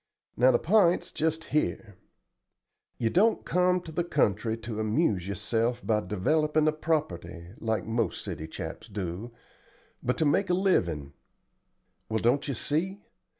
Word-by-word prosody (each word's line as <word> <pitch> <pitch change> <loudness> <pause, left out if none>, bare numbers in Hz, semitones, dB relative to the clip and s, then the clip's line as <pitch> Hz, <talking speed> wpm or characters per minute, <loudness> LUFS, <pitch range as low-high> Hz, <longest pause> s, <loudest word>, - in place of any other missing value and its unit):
Now 125 +2 +5
the - - +5
p'int's 180 -1 +3
just 160 +1 -1
here. 115 -8 -1 1.0
You 115 -1 0
don't 220 +5 +3
come 180 0 +2
to 165 - -9
the 170 +2 0
country 115 - +1
to 115 -1 -6
amuse 110 - +1
yourself 115 +5 -1
by 105 -1 +2
developin' 150 +10 +1
a - - +5
property, 155 - -2
like 110 -3 -1
most 115 +1 -1
city 80 - -5
chaps - - -7
do, 100 +3 -5 0.7
but 125 - -1
to 160 - +2
make 190 +6 +2
a 180 - +3
livin'. 85 - +1 1.0
Well, 110 - 0
don't 120 +6 +2
you 140 - -2
see? 185 - -2
125 Hz, 145 wpm, -28 LUFS, 105-160 Hz, 1.0 s, Now